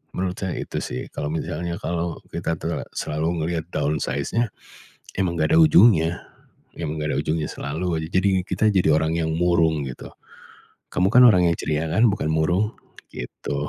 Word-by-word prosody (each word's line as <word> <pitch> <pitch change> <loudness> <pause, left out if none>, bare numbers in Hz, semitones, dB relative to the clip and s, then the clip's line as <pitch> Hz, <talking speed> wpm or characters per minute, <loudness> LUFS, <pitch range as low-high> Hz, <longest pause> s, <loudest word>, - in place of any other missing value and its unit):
Menurut 90 0 -2
saya 95 -2 -3
itu - - -4
sih. 65 - -5
Kalau 75 - -3
misalnya 85 +1 -3
kalau 85 -1 -3
kita 85 -1 -2
terla 85 +2 -3
selalu 80 +1 -2
ngelihat 85 -2 -2
down 75 +1 0
size-nya, 115 -1 -1 0.7
emang 90 -3 0
enggak 80 - +2
ada 165 - +6
ujungnya 90 - +5 0.6
emang 80 -2 -4
enggak 75 0 -1
ada - - -1
ujungnya, 80 -1 -1
selalu 80 +6 -4
aja 80 - -5
jadi 95 +2 +2 0.2
kita - - -1
jadi 95 -4 +2
orang 80 +1 +1
yang 80 -1 0
murung, 85 -4 +2
gitu. 65 - -9 0.8
Kamu 90 - +2
kan 125 - +8
orang 90 -5 +4
yang 85 - +1
ceria, 80 +1 -1
kan? 110 +9 +4
Bukan 95 -6 -2
murung? 90 +7 +1 0.4
Gitu. 70 +3 -5
85 Hz, 170 wpm, -23 LUFS, 80-90 Hz, 0.8 s, kan